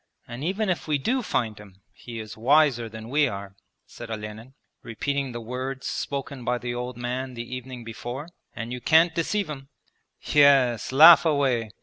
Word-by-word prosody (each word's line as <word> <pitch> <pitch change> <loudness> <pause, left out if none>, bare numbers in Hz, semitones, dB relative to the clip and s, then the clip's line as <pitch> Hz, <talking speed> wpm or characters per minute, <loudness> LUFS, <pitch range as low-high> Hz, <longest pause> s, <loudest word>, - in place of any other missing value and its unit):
'And 120 +3 -7
even 195 +6 -1
if 180 -3 -2
we 150 -1 +1
do 250 - 0
find 110 - -2
him 95 -2 -16
he 115 -2 -9
is 110 -1 -8
wiser 130 -1 +3
than 110 0 -9
we 145 +3 +2
are,' 100 -4 -7 0.3
said 120 - -11
Olenin, 110 +3 -7 0.3
repeating 140 +4 -3
the 120 - -6
words 130 +3 -5
spoken 140 -2 -4
by 125 +1 0
the 120 0 -4
old 125 0 -5
man 125 +1 -4
the 120 0 -6
evening 125 -1 -8
before, 120 +6 -7 0.3
'and 115 +1 -5
you 125 - -6
can't 165 +4 +4
deceive 195 +5 -1
him!' 135 -3 -8 0.5
'Yes, 135 -7 +4
laugh 160 +5 +9
away! 135 -8 +1
125 Hz, 170 wpm, -25 LUFS, 115-145 Hz, 0.5 s, laugh